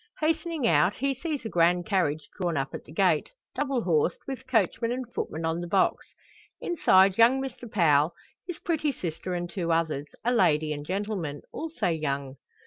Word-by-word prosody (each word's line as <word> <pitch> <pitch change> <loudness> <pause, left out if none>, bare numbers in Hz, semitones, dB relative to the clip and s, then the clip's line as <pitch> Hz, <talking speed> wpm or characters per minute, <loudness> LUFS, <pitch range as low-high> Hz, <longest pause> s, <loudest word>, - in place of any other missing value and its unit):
Hastening 320 -2 0
out, 180 0 +4
he 275 +2 0
sees 285 -1 -4
a - - -2
grand 175 0 +3
carriage 165 -7 0
drawn 175 -4 -1
up 135 0 -2
at - - -7
the - - -14
gate, - - +2 0.2
double 275 -5 -1
horsed, 165 -1 +2
with 265 -1 -6
coachman 230 -1 +1
and 255 +1 -3
footman 160 +1 -3
on 165 +1 -1
the 175 - -5
box; 190 +2 +1 0.5
inside 195 - +4
young 240 +4 +6
Mr 245 -4 -6
Powell, 155 -4 +3 0.3
his 355 -3 -5
pretty 310 -3 0
sister, 180 - -4
and 175 0 -3
two 175 -1 -3
others 160 -3 0 0.2
a 245 - +3
lady 155 -8 +3
and 145 0 -7
gentleman, 190 -7 -3
also 320 - -2
young. 140 -4 -2
185 Hz, 175 wpm, -27 LUFS, 160-255 Hz, 0.5 s, young